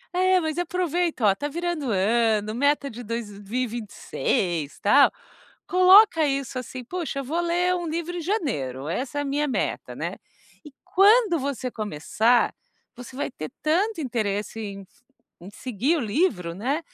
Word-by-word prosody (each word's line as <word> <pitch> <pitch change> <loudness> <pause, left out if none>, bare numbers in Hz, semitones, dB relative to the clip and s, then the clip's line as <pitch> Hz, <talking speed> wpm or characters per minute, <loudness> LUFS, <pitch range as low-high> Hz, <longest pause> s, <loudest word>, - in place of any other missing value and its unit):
É, 370 0 +4
mas 315 -1 -2
aproveito, 350 -3 -1
oh, 205 -3 +4
tá 290 - -3
virando 340 -1 -3
o - - 0
ano, 215 +1 +2
meta 285 +3 +1
de 245 -2 -8
2026, 210 - -3
tal, 275 +8 +5 0.6
coloca 370 -3 +6
isso, 275 -2 -2
assim: 255 0 -7
"Poxa, 290 0 -4
vou 320 +7 -2
ler 350 +1 +1
um 350 -1 -3
livro 340 +2 -3
em 345 - -4
janeiro. 150 - -2
Essa 260 - -3
é - - +1
a - - -2
minha 290 +2 0
meta, 265 - -2
né." - - -4 0.5
E 300 - -12
quando 405 -1 +4
você 265 -2 -3
começar, 220 +4 +1 0.4
você 250 +1 -10
vai 285 +3 -3
ter 155 - -7
tanto 345 +6 +1
interesse 220 -5 -2
em 200 -2 -7 0.5
em 180 +3 -10
seguir 255 - -1
o - - -1
livro, 205 - 0
né, 260 - -1
275 Hz, 150 wpm, -25 LUFS, 215-340 Hz, 0.6 s, coloca